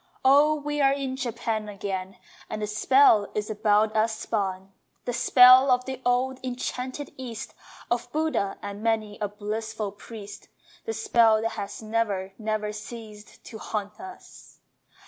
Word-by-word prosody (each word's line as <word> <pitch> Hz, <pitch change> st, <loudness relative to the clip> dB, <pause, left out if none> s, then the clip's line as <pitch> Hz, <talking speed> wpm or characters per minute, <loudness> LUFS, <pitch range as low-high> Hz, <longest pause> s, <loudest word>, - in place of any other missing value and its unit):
O 290 Hz, +3 st, +6 dB
we 295 Hz, 0 st, -3 dB
are 275 Hz, 0 st, +5 dB
in 270 Hz, -2 st, -3 dB
Japan 225 Hz, -4 st, -3 dB
again 195 Hz, -2 st, -5 dB, 0.3 s
And 215 Hz, 0 st, -4 dB
the -, -, +1 dB
spell 215 Hz, 0 st, +4 dB
is 210 Hz, +1 st, -2 dB
about 215 Hz, 0 st, +2 dB
us 220 Hz, 0 st, +1 dB
spun! 190 Hz, -3 st, -3 dB, 0.3 s
The 245 Hz, -, -2 dB
spell 255 Hz, +2 st, +7 dB
of 250 Hz, 0 st, +3 dB
the 265 Hz, -1 st, -6 dB
old 255 Hz, +1 st, +1 dB
enchanting 255 Hz, +2 st, -4 dB
East, 240 Hz, -4 st, -7 dB, 0.4 s
Of 240 Hz, 0 st, -1 dB
Buddha 310 Hz, -10 st, -1 dB
and 205 Hz, 0 st, -6 dB
many 220 Hz, -2 st, -1 dB
a 210 Hz, -, -1 dB
blissful 210 Hz, 0 st, -4 dB
priest, 205 Hz, 0 st, -11 dB, 0.4 s
The 225 Hz, -, -2 dB
spell 225 Hz, 0 st, +3 dB
that 225 Hz, -, +1 dB
has 205 Hz, 0 st, -6 dB
never, 210 Hz, -4 st, -1 dB
never 215 Hz, -1 st, -2 dB
ceased 215 Hz, 0 st, -10 dB
To 220 Hz, -, -10 dB
haunt 210 Hz, 0 st, -5 dB
us! 375 Hz, 0 st, -12 dB
220 Hz, 145 wpm, -26 LUFS, 210-250 Hz, 0.4 s, spell